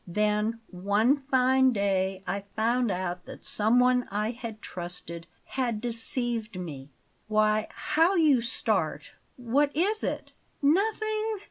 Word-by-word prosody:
Then 210 +4 0
one 205 +8 +2
fine 260 -2 +3
day 195 -2 0
I 200 0 -3
found 235 +2 +1
out 180 -1 -3
that - - -10
someone 250 +3 +3
I 210 +2 -1
had 230 -3 -7
trusted 175 -3 -7 0.2
had 240 -5 -2
deceived 230 -2 -3
me. 145 -6 -7 0.4
Why, 215 0 +2
how 325 +5 +2
you 300 -8 +4
start! 235 +2 -1 0.2
What 260 +4 +1
is 410 +7 +2
it?" - - -3 0.3
"Nothing. 435 +7 +1
230 Hz, 120 wpm, -28 LUFS, 200-265 Hz, 0.4 s, you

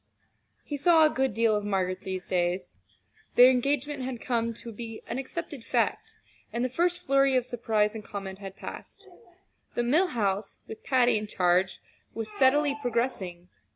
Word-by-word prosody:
He 290 - -4
saw 320 +2 +5
a 305 - +3
good 265 -1 0
deal 225 +1 +2
of 210 - -1
Margaret 190 -2 -1
these 190 -1 -5
days. 180 0 -1 0.6
Their 250 +1 +9
engagement 280 +2 0
had 255 -2 -4
come 230 -4 -1
to 235 - -8
be 225 0 -8
an 245 - -4
accepted 290 -1 -6
fact, - - -1 0.4
and 240 +1 -1
the - - -1
first 350 +6 +1
flurry 275 0 +3
of 250 - 0
surprise 220 -4 0
and 220 -1 -7
comment 195 -2 -7
had 195 -1 -8
passed. 405 - -9 0.7
The 240 - +1
Mill 310 +10 +3
House, 200 - -1
with 220 - -9
Patty 245 -4 +3
in 210 - -6
charge, 185 -1 +1 0.4
was 225 -1 -4
steadily 285 +4 +3
progressing. 215 -8 -2
235 Hz, 165 wpm, -28 LUFS, 200-265 Hz, 0.7 s, Their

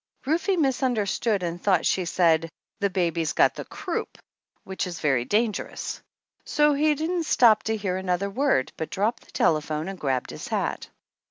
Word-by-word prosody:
Rufe 345 +6 +1
misunderstood 240 - 0
and 175 0 -4
thought 185 -5 +2
she 185 - +1
said, 165 -2 +2 0.3
"The 200 - +1
baby's 170 -4 0
got - - +4
the - - -7
croup," - - -5 0.5
which 190 0 -3
is 175 -2 -6
very 135 -6 +1
dangerous. 215 - -1 0.4
So 295 -1 +3
he 300 +1 +2
didn't 330 +3 -1
stop 220 -3 +5
to 220 0 0
hear 190 -3 -2
another 190 +1 -1
word, 260 - +1
but 160 - -4
dropped 210 +5 -1
the - - -20
telephone 155 0 0
and 195 -1 -6
grabbed 130 -3 -1
his - - -7
hat. - - -2
195 Hz, 165 wpm, -25 LUFS, 170-250 Hz, 0.5 s, stop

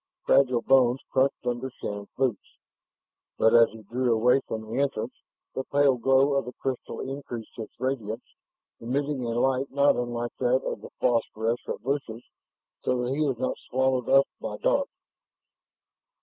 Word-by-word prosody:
Fragile 125 -3 +4
bones 130 -1 +4
crunched 135 -1 +1
under 125 +2 -2
Shann's 100 -4 -6
boots, 130 -7 -2 0.8
but 110 - +4
as 115 -1 +7
he 110 0 -12
drew 120 +4 0
away 125 +4 +4
from 110 0 -4
the 115 +5 -2
entrance, 130 -4 -1 0.4
the 130 - -3
pale 140 -2 +3
glow 135 +3 +3
of 140 - +1
the 125 - -7
crystal 130 -2 -4
increased 130 -4 -6
its 110 - -8
radiance, 120 -3 -3 0.5
emitting 135 +3 -2
a 120 0 -1
light 135 +1 +1
not 140 +1 +4
unlike 120 -1 -3
that 130 +1 +2
of - - -4
the - - -9
phosphorescent 115 -1 -1
bushes, 125 -4 -3 0.6
so 125 -1 0
that 125 +2 -1
he 150 - -1
was 135 -5 +1
not 130 +1 -2
swallowed 130 -1 0
up 135 0 +6
by - - -5
dark. - - +1
125 Hz, 155 wpm, -27 LUFS, 120-135 Hz, 0.8 s, as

